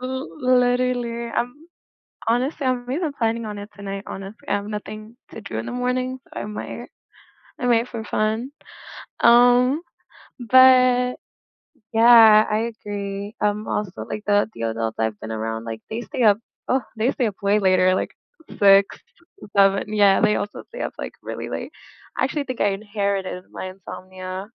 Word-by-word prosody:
L 260 +2 -4
literally, 245 -1 +1
I'm 245 +1 -2 0.7
honestly, 260 +4 0
I'm 245 -1 -1
really 305 +5 -2
planning 230 -1 0
on 210 -1 -6
it 205 +1 -9
tonight, 200 0 -6
honestly, 195 +2 -9
I - - +1
have 205 0 -2
nothing 215 +2 -7
to 225 - -9
do 115 - -6
in 110 - -4
the - - -5
morning, 255 +1 -1
so - - -9
I - - -4
might 210 0 -7 0.7
I 245 - -1
might 235 0 +2
for 230 -2 -6
fun, 220 +5 -1 0.7
um, 245 +5 +5 0.6
but 255 0 +5 0.8
yeah, 225 -2 +7
I 225 +2 0
agree, 200 0 -5
um, 210 +1 -1
also 205 -4 -2 0.2
like 215 - -5
the 205 +1 +3
the - - -7
adults 115 0 -2
I've 110 -2 -1
been 110 - -6
around, 115 +1 -4
like 115 -1 -6
they 225 - -3
stay 255 - -4
up, 205 -1 +5 0.3
oh, 260 +1 +2 0.2
they 225 +4 +1
stay 245 - 0
up 205 - -4
way 200 +1 +3
later, 185 -1 +4 0.6
like 195 -1 +4 0.4
6, 205 - -13
7, 195 +1 +3
yeah, 200 -2 +5
they 210 -1 +3
also 205 - -4
stay - - -10
up - - -4
like - - -5
really - - -6
late. - - -5 0.5
I - - +3
actually 285 +2 -2
think 255 -3 -6
I 205 - +3
inherited 200 -2 -3
my - - -6
insomnia. 185 0 -8
215 Hz, 165 wpm, -22 LUFS, 195-245 Hz, 0.8 s, yeah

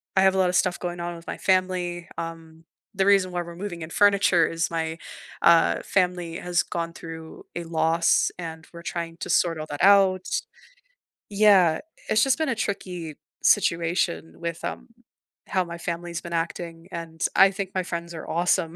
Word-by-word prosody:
I 190 - +5
have 190 0 +4
a - - 0
lotta 180 -1 +2
stuff 180 0 +2
going 175 0 -4
on 170 0 -4
with 165 - -12
my - - -4
family, 180 -2 0
um, 165 -1 -7 0.3
the 195 0 +1
reason 195 -2 +4
why 175 0 -2
we're 170 0 -8
moving 175 -3 -6
in 160 - -7
furniture 200 -4 +4
is 165 0 -1
my, 160 0 -2 0.4
uh, 170 -1 +5
family 180 -3 0
has 180 -1 0
gone 170 -1 -4
through 160 -1 -10
a 175 - -3
loss, 165 0 +2
and 160 -2 -7
we're 170 0 -10
trying 170 -1 -4
to - - -6
sort 165 -2 +2
all 155 - -4
that 145 - -3
out. 195 -2 +5 1.0
Yeah, 200 -6 +5 0.3
it's 215 - +4
just 270 +2 +3
been 315 -3 0
a 235 - 0
tricky 180 -7 -4 0.3
situation 170 -3 +1
with, 170 -1 -5
um, - - -5 0.6
how 185 -2 +1
my 170 0 -7
family's 170 0 -4
been 170 -1 -7
acting, 165 +1 -4
and 165 -1 -6
I 195 0 +7
think 195 0 -4
my 185 - +1
friends 170 -1 -5
are 160 - -8
awesome 170 0 +1
170 Hz, 180 wpm, -25 LUFS, 165-185 Hz, 1.0 s, I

